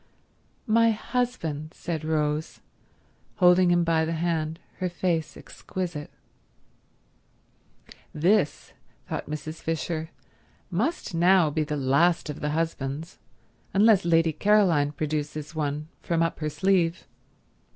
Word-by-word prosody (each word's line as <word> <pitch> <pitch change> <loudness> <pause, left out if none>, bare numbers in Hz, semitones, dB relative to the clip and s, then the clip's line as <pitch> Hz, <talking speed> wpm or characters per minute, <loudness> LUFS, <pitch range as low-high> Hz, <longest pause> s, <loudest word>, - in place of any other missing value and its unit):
"My 230 +1 +4
husband," 215 - -2
said 160 -3 -4
Rose, 155 0 -1 0.8
holding 180 0 +5
him 175 0 +3
by 165 -1 +2
the 160 +1 -1
hand, 160 -1 -1 0.2
her 185 - -1
face 170 -1 -2
exquisite. 175 -5 -6 2.0
"This," 175 +1 +1 0.3
thought - - -5
Mrs. 155 +1 -6
Fisher, 160 0 -3 0.6
"must 220 - -1
now 175 -1 +4
be 155 +1 0
the 150 0 -3
last 150 +5 +2
of 145 - -9
the 150 - -2
husbands, 155 0 -3 0.6
unless 210 -1 +5
Lady 165 -1 +3
Caroline 175 -6 +3
produces 150 0 -4
one 150 -1 -2
from 165 -1 +1
up 165 - -2
her 155 -1 -1
sleeve." 175 +2 +1
165 Hz, 110 wpm, -26 LUFS, 150-180 Hz, 2.0 s, holding